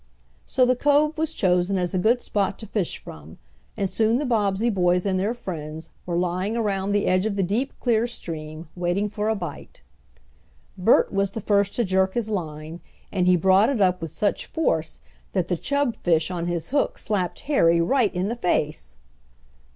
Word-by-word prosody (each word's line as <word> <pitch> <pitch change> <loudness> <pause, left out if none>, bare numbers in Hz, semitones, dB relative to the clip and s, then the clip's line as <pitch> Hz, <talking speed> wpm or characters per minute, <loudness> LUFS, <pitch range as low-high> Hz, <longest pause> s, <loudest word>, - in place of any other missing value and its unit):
So 255 -2 +3
the 255 0 +3
cove 295 +3 +3
was 320 0 -1
chosen 180 +1 +2
as 180 0 -1
a 185 - +1
good 235 +6 +3
spot 200 -2 -1
to 220 - -9
fish 200 -4 -2
from, 80 +1 -12 0.4
and 200 - 0
soon 220 +4 +2
the 295 - -2
Bobbsey 220 -1 +1
boys 180 -2 +2
and 190 -2 +1
their 210 +5 0
friends 160 -7 -7 0.2
were 170 -1 -1
lying 180 +5 -1
around 200 -3 -1
the 205 0 +1
edge 185 +3 +2
of 210 - -2
the 195 - +1
deep 225 +9 -1
clear 235 -1 +2
stream, 155 -7 -7
waiting 180 +4 0
for 210 +1 -2
a 220 - +1
bite. 180 -4 -8 0.9
Bert 190 +4 +3
was 195 0 0
the - - -4
first 200 -1 +1
to 240 - +1
jerk 190 -1 +1
his 225 -2 -1
line, 160 -3 -5 0.3
and 180 -2 +1
he 180 - +6
brought 190 +6 +4
it 270 -5 -1
up 185 -2 +2
with 165 -2 -5
such 205 - -1
force 160 - -1 0.3
that 185 -3 0
the 180 - +1
chubfish 190 - 0
on 175 -1 -3
his 170 -2 -2
hook 280 +1 0
slapped 190 -5 -2
Harry 170 - +3
right 215 +5 +2
in 180 +2 0
the 230 - -2
face! 150 - -1
195 Hz, 190 wpm, -24 LUFS, 175-220 Hz, 0.9 s, he